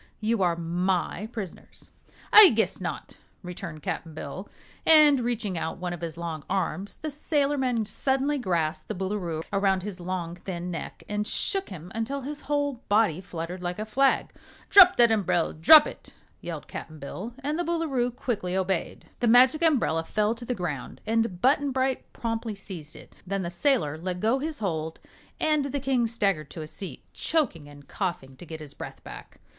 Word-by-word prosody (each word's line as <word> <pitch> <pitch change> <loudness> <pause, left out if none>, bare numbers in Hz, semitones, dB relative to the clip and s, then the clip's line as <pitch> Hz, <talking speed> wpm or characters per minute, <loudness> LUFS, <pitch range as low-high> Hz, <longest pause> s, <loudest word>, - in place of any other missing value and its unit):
You 220 -1 0
are 175 -2 +3
my 180 +4 -1
prisoners." 200 -7 -9 0.4
"I 425 -2 +12
guess 220 - 0
not," - - -5 0.3
returned 175 -4 -7
Cap'n 160 -2 -4
Bill, 170 +7 -7 0.3
and 300 -3 +7
reaching 235 -7 -2
out 160 - -3
one 180 -1 -3
of 175 - -8
his 165 -1 -5
long 165 -3 -5
arms, 190 0 -2
the 310 - -2
sailorman 275 -5 0
suddenly 270 +6 0
grasped 160 -7 -1
the 215 - -4
Boolooroo 185 -4 -3
around 195 -2 +2
his 200 -2 -6
long, 175 -1 -4
thin 180 -1 -5
neck 165 - -6
and 210 0 -2
shook 390 - -1
him 180 -1 -9
until 245 +5 -2
his 290 +3 -6
whole 285 -4 -1
body 205 -5 +3
fluttered 175 0 -6
like 175 0 -3
a 215 - -3
flag. 265 +5 +2 0.4
"Drop 370 -2 +9
that 235 -1 +5
umbrel 190 -6 +1
drop 295 - +8
it!" - - -10 0.3
yelled - - -6
Cap'n 155 - -8
Bill, 190 +11 -7
and 300 +4 -1
the - - +1
Boolooroo 315 -8 0
quickly 210 -7 -3
obeyed. 190 -2 -2
The 240 - +1
Magic 255 +6 +6
Umbrella 260 - +2
fell 210 +5 0
to 235 +1 -9
the 250 - -2
ground 155 - -5
and 225 -4 0
Button 285 +2 +3
Bright 260 0 -1
promptly 225 -2 -3
seized 175 -6 -9
it. - - -14
Then 195 0 -1
the 170 - -4
sailor 175 - +1
let 180 +1 -3
go 225 +7 +2
his 305 +2 -3
hold 160 -6 -3 0.4
and 305 -2 +2
the 280 0 -2
King 260 -3 +1
staggered 195 -10 0
to 160 - -7
a - - -8
seat, 190 +4 -8
choking 255 - -1
and 145 -1 -15
coughing 175 -9 -4
to 175 - -12
get 160 0 -7
his 150 -2 -10
breath - - -9
back. - - -11
205 Hz, 180 wpm, -27 LUFS, 175-260 Hz, 0.4 s, I